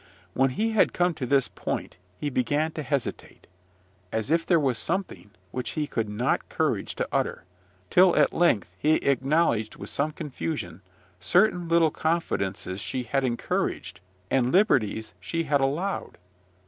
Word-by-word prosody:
When 135 +4 +3
he 220 - -1
had 220 - +3
come 175 0 +2
to 135 -5 -4
this 135 -1 +3
point, - - -5 0.2
he 145 - -2
began 145 +5 +1
to 155 - -5
hesitate, 140 -2 -4 0.7
as 110 +5 -2
if 165 0 +2
there 170 -3 +4
was 130 -6 0
something 190 - -3 0.2
which 125 -1 -4
he 150 -1 0
had 110 -2 0
not 105 +4 -1
courage - - -1
to - - -2
utter, - - -1 0.5
till 180 -1 +6
at - - +4
length 170 -12 +2
he 155 +1 +4
acknowledged 135 -5 +1
with - - -9
some 145 +2 0
confusion 150 - -5 0.4
certain 175 - +2
little 165 -2 +4
confidences 100 - -2
she 125 +3 -3
had 135 +4 0
encouraged, 120 -7 -2 0.3
and 130 -1 +2
liberties 115 - +2
she 165 0 -2
had 145 -3 +1
allowed. 160 +9 -2
140 Hz, 150 wpm, -26 LUFS, 125-165 Hz, 0.7 s, till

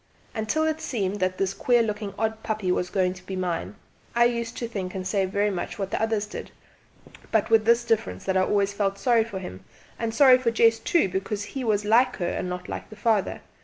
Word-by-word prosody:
Until 220 +8 0
it 315 0 -1
seemed 205 -5 -2
that 185 0 0
this 195 0 0
queer 240 +2 +3
looking 210 -2 -4
odd 220 0 -1
puppy 215 -5 -1
was 180 0 0
going 185 -2 +1
to 185 -1 -14
be 190 - -4
mine 170 - -3 0.4
I 235 0 +5
used 235 -1 -1
to 235 - -3
think 195 -5 -5
and 185 -1 -4
say 195 0 +1
very 205 +2 +1
much 180 - -4
what 195 -2 -3
the - - -1
others 220 -2 0
did 210 - -8 0.8
but - - +1
with 220 -1 +5
this 235 +1 +4
difference, 210 - -1
that 190 - -1
I 185 - +4
always 200 +1 +1
felt 200 -1 -1
sorry 230 +1 +3
for 220 -3 -7
him, 95 - -8 0.4
and 230 -1 -1
sorry 255 +2 +6
for 245 -2 +1
Jess 230 0 +4
too, 320 - +2
because 195 +2 -3
he 265 +5 -5
was 210 -3 +1
like 235 +5 +4
her 175 - -2
and 180 - -3
not 180 0 -5
like - - -6
the 215 - -11
father. 215 -2 0
210 Hz, 230 wpm, -25 LUFS, 190-230 Hz, 0.8 s, sorry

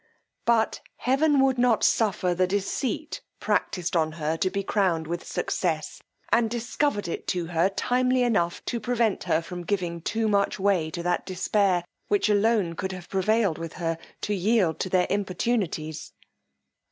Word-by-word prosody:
But 230 -2 +2
heaven 275 +2 +2
would 260 -2 +1
not 240 -3 +3
suffer 190 -5 +2
the 185 +1 +2
deceit 210 - -2 0.2
practised 180 -1 -1
on 160 -2 +1
her 155 0 -1
to 185 +3 0
be 200 +1 -2
crowned 185 -6 +1
with 170 +2 -4
success, 160 -4 -2 0.3
and 230 -1 +3
discovered 235 -1 -1
it 170 - -5
to 175 -2 -1
her 170 +2 +2
timely 250 +4 +1
enough 175 -8 0
to 240 - -2
prevent 230 -2 0
her 160 +1 +1
from 175 +1 -6
giving 175 -3 -2
too 220 +6 -1
much 200 -1 +1
way 190 -5 +2
to 170 +2 -5
that 175 0 0
despair, 185 -1 +1 0.2
which 205 +1 +2
alone 210 -4 +2
could 190 +3 -3
have 180 -2 -9
prevailed 200 -2 +1
with 165 -1 -6
her 165 -2 -2 0.2
to 210 - -1
yield 195 -3 +2
to 185 - -2
their 185 -1 +3
importunities. 190 -5 -2
195 Hz, 160 wpm, -26 LUFS, 175-225 Hz, 0.3 s, not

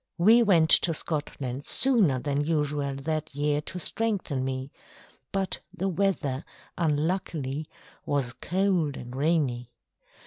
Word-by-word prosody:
We 220 +7 +6
went 170 -8 +4
to 165 -2 +5
Scotland 145 -4 -3
sooner 220 - +4
than 145 +2 -1
usual 145 -3 -1
that 155 +1 -4
year 145 0 0
to 180 - -7
strengthen 185 -9 -1
me, 130 +1 -4 0.6
but 195 -1 -2
the 195 0 -2
weather, 165 -7 -1 0.3
unluckily, 155 -3 -1 0.3
was 135 -4 -1
cold 180 -5 0
and 125 +1 -8
rainy. 135 -6 0
150 Hz, 115 wpm, -27 LUFS, 140-180 Hz, 0.6 s, We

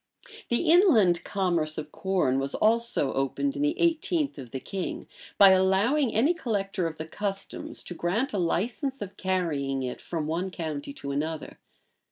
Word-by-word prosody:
The 240 +6 +2
inland 225 - +5
commerce 170 -6 0
of 150 -1 -5
corn 180 -9 +1
was 135 0 -2
also 230 - +1
opened 205 - -1
in 290 - -3
the 300 +6 0
eighteenth 330 - +1
of 125 -3 -8
the 130 - -5
king, 185 +7 -5 0.3
by 200 -1 +9
allowing 195 +9 +3
any 270 +11 +4
collector 195 - -2
of 160 - -7
the 155 - -5
customs 195 +4 -4
to - - -6
grant 205 - -1
a 200 - 0
license 235 - -1
of 195 -1 -9
carrying 150 -8 -1
it 125 - -5
from 160 -3 -3
one 170 +5 -2
county 160 - -5
to 140 - -6
another. 155 +2 -4
190 Hz, 165 wpm, -27 LUFS, 155-235 Hz, 0.3 s, by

